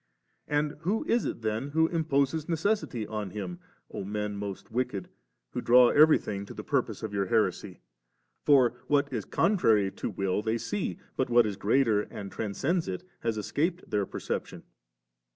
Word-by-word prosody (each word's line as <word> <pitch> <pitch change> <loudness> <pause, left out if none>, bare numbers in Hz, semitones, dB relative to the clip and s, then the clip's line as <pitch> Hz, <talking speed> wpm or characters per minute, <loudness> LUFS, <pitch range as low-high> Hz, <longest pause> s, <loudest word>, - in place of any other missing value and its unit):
And 150 0 0
who 190 +8 -1
is 235 - +1
it 115 - -4
then 110 +4 -1
who 160 - +6
imposes 155 -2 0
necessity 165 - 0
on 105 -2 -4
Him, 90 -3 -6 0.3
O - - -5
men 105 +1 -3
most 100 0 -6
wicked, 125 -4 -2 0.4
who - - -3
dnlw 125 0 +6
everything 145 -10 +4
to - - -9
the - - -6
purpose - - -1
of 110 -2 -4
your 100 -1 0
heresy? - - 0 0.6
for 130 -5 +5
what 145 -1 +2
is 110 -5 -2
contrary 110 - +3
to - - -4
will 95 +1 -1
they 110 +1 0
see; 200 - -3 0.2
but 130 - 0
what 120 -1 +5
is 105 -2 -2
greater 110 +1 +2
and 100 -2 -8
transcends 140 - -1
it 180 - -4 0.2
has 115 -2 -1
escaped 165 - -2
their 100 -2 +1
perception. - - -5
115 Hz, 165 wpm, -29 LUFS, 105-150 Hz, 0.6 s, who